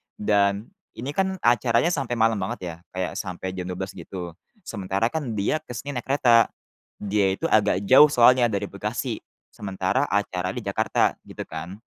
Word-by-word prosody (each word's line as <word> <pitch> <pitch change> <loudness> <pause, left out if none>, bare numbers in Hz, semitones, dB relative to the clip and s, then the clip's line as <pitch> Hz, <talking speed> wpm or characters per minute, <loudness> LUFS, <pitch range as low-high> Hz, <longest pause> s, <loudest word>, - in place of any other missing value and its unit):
dan 100 - +1 0.2
ini 130 +5 -5
kan 190 +4 0
acaranya 120 +5 +3
sampai 135 -7 -1
malam 110 -2 +2
banget 95 - -3
ya, 85 -2 -5 0.2
kayak 95 -1 -2
sampai 95 -1 -5
jam 90 -1 -5
12 95 +1 -4
gitu, 90 -1 -7 0.3
sementara 100 - -2
kan 145 -8 -3
dia 105 +10 0
ke 125 -5 -10
sini 135 +5 -5
naik - - -12
kereta. 120 -4 +5 0.5
Dia 100 -2 +1
itu - - -20
agak 100 -3 +3
jauh 130 +7 +8
soalnya, 125 -1 +5
dari 100 0 -1
Bekasi, - - -3 0.4
sementara 95 +6 -1
acaranya 95 -2 -1
di - - -15
Jakarta - - +1
gitu - - -8
kan. 90 +4 -7
105 Hz, 165 wpm, -24 LUFS, 95-120 Hz, 0.5 s, jauh